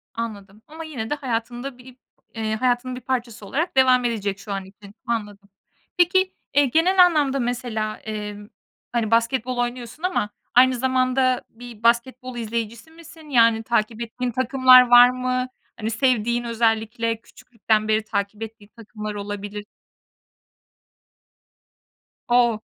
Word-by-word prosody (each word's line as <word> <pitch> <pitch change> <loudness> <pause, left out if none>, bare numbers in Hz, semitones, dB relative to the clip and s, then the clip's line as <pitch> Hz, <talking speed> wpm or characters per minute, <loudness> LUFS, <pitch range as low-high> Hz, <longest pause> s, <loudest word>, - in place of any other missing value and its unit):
Anladım. 210 -3 -6
Ama 320 +2 -9
yine 255 -9 -6
de - - 0
hayatında 245 -1 -4
bir 250 0 -15 0.4
eee, 220 -1 -2
hayatının 250 +2 0
bir 250 - -8
parçası 240 -5 -4
olarak 310 - -2
devam 255 -1 +5
edecek 205 -4 -2
şu 200 +1 -9
an 195 -1 -4
için. 200 +1 -16
Anladım. 205 -3 -4 0.5
Peki, 375 +1 +3 0.2
eee, 285 0 +5
genel 360 +7 +5
anlamda 290 -6 +1
mesela, 235 -3 -3
emm, 210 -1 -7 0.4
hani, 230 -2 -1
basketbol 245 +2 +1
oynuyorsun 245 +4 -4
ama 365 - 0 0.3
aynı 255 +1 +6
zamanda 255 0 +1
bir 235 -1 -13
basketbol 245 +1 0
izleyicisi 230 +4 -4
misin? 325 -1 -15
Yani 230 -4 +4
takip 225 0 -1
ettiğin 245 +2 -3
takımlar 255 0 +6
var 245 0 +8
mı? 255 0 -2 0.3
Hani, 220 -1 -3
sevdiğin, 240 0 +1
özellikle 230 0 0
küçüklükten 220 -2 -2
beri 215 0 +1
takip 210 0 -3
ettiğin 220 -2 -11
takımlar 215 -2 -7
olabilir. 205 0 -6 2.6
O! 240 -2 +3
235 Hz, 130 wpm, -23 LUFS, 220-255 Hz, 2.6 s, var